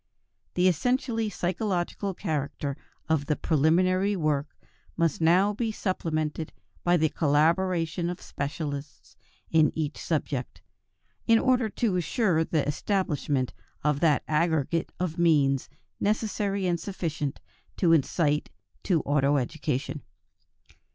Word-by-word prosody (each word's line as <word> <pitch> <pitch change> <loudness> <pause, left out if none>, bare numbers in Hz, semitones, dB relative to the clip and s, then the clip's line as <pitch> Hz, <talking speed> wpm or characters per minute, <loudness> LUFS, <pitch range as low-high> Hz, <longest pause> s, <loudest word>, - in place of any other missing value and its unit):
The 180 +1 +4
essentially 225 - +1
psychological 185 0 -2
character 145 -5 -3 0.3
of 155 -3 +1
the 150 - +2
preliminary 185 +7 +2
work 155 -4 0 0.5
must 165 -2 +1
now 185 +6 +4
be 225 +1 -1
supplemented 160 -6 -2 0.3
by 175 0 +4
the 160 -1 +3
collaboration 165 +3 +1
of 180 - -5
specialists 145 0 -5 0.4
in 155 -2 +4
each 155 -2 -3
subject, 145 -5 -3 0.6
in 230 - +6
order 250 -1 +2
to 205 -3 0
ensure 175 -2 +1
the 155 -3 0
establishment 145 -5 -1 0.3
of 150 -1 +1
that 150 -4 +3
aggregate 160 0 +1
of 175 -2 -2
means 145 -6 +3 0.3
necessary 205 -2 0
and 175 -2 +1
sufficient 160 -6 -3 0.4
to 170 -3 +4
incite 150 0 +1 0.3
to 170 -5 +1
auto 145 0 +2
education. 140 +1 -2
165 Hz, 110 wpm, -27 LUFS, 150-185 Hz, 0.6 s, in